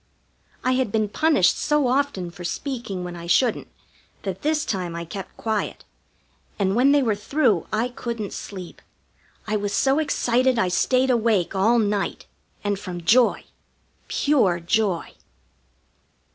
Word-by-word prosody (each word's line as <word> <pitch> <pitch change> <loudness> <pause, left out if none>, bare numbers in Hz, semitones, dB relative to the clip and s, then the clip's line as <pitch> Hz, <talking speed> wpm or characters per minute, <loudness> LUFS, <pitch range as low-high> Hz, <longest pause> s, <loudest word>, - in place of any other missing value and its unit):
I 255 - +2
had 255 -4 +1
been 215 -1 0
punished 305 - +3
so 295 -3 +2
often 250 -9 0
for 175 - -10
speaking 210 0 -4
when 175 0 -6
I 170 0 -8
shouldn't 230 +8 +2 0.6
that 190 -2 -4
this 305 0 0
time 180 -4 -3
I 170 0 -5
kept 190 +3 -8
quiet, 220 -2 -2 0.7
and 195 -1 +1
when 260 +4 +5
they 285 -1 +4
were 225 -4 +2
through 210 - +1
I 225 +3 0
couldn't 235 -4 -5
sleep. 185 -4 -8 0.6
I 215 0 0
was 205 0 -3
so 270 +6 +2
excited 255 -4 +1
I 190 -4 +2
stayed 255 +8 +2
awake 225 -7 +1
all 210 +5 +3
night. 210 -3 -1 0.4
And 205 -1 -1
from 180 -3 -6
joy 240 +7 +4 0.6
pure 230 -12 +2
joy. 185 0 0
215 Hz, 145 wpm, -23 LUFS, 190-255 Hz, 0.7 s, when